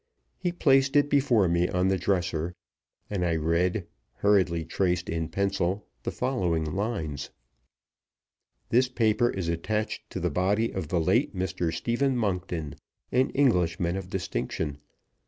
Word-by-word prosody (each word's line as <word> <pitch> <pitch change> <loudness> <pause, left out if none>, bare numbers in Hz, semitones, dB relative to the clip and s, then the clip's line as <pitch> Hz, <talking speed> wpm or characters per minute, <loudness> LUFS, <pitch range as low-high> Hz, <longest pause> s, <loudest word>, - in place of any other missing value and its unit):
He 180 -1 0
placed 135 -5 +3
it 145 0 +4
before 130 -9 +4
me 85 +1 +2
on 90 +1 +1
the 95 - +2
dresser, 90 -3 -1 0.5
and 100 -3 -2
I 85 -2 +1
read, 85 +4 +1 0.3
hurriedly 90 -4 +2
traced 90 -2 0
in 80 -1 -2
pencil, 100 0 -1 0.2
the - - -3
following 90 -11 0
lines: 80 - -3 1.4
"This 125 +2 +3
paper 115 -1 +2
is 95 -6 -3
attached 105 +6 -2
to - - -4
the - - -1
body 105 +5 +1
of 95 -5 -3
the 85 - +1
late 80 - +2
Mr. 90 -2 -1
Stephen 125 +8 0
Monkton, 90 -8 -2 0.3
an 130 +1 +3
Englishman 90 -10 +2
of 95 -1 -5
distinction. 90 -6 -3
95 Hz, 140 wpm, -27 LUFS, 85-110 Hz, 1.4 s, it